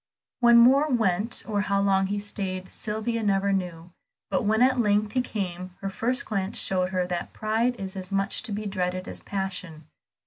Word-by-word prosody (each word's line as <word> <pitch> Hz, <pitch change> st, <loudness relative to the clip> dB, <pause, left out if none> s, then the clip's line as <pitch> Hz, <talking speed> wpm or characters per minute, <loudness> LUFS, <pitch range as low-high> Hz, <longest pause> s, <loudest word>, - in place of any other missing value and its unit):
Where 240 Hz, -1 st, +6 dB
Moor 260 Hz, +6 st, +6 dB
went 225 Hz, -3 st, +1 dB
or 205 Hz, -2 st, 0 dB
how 200 Hz, -1 st, +1 dB
long 195 Hz, -1 st, +2 dB
he 205 Hz, +1 st, -2 dB
stayed 190 Hz, -2 st, -5 dB
Sylvia 220 Hz, +2 st, -2 dB
never 200 Hz, -1 st, +1 dB
knew, 175 Hz, -2 st, -3 dB, 0.4 s
but -, -, +2 dB
when 220 Hz, +3 st, +3 dB
at 260 Hz, 0 st, +3 dB
length 210 Hz, -1 st, +2 dB
he 255 Hz, -, +1 dB
came, 185 Hz, -6 st, -5 dB
her 195 Hz, 0 st, -4 dB
first 250 Hz, +6 st, 0 dB
glance 195 Hz, 0 st, -2 dB
showed 185 Hz, -1 st, +1 dB
her 185 Hz, -1 st, 0 dB
that 180 Hz, -1 st, -4 dB
pride 225 Hz, +3 st, 0 dB
is 195 Hz, -3 st, -6 dB
as 185 Hz, 0 st, -6 dB
much 195 Hz, 0 st, 0 dB
to -, -, -7 dB
be 210 Hz, +1 st, -3 dB
dreaded 185 Hz, -2 st, -2 dB
as -, -, -6 dB
passion. 185 Hz, -5 st, -5 dB
200 Hz, 185 wpm, -26 LUFS, 185-220 Hz, 0.4 s, Where